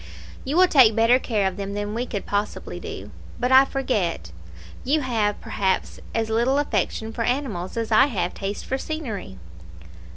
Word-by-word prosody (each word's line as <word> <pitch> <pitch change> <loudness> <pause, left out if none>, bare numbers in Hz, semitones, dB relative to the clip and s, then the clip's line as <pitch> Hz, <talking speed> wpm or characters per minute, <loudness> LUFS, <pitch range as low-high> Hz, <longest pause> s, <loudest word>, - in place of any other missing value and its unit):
You 285 +5 -1
will 370 0 +7
take 255 -10 +6
better 230 +3 +5
care 215 -6 0
of 190 0 -4
them 200 0 -4
than 205 0 -3
we 240 +3 -2
could 205 -4 -4
possibly 205 +1 -3
do. - - -8 0.3
But 250 +1 0
I 265 +1 +8
forget: 205 - -2 0.5
you 295 +4 +1
have, 220 -6 0
perhaps, 190 -1 -1 0.2
as 225 -1 0
little 240 +5 +2
affection 225 -4 -1
for 230 - -4
animals 230 -8 -2
as 230 0 -2
I 220 +6 +6
have 180 -9 -2
taste 200 +1 -5
for 265 - -2
scenery." 245 - -5
225 Hz, 170 wpm, -23 LUFS, 205-260 Hz, 0.5 s, I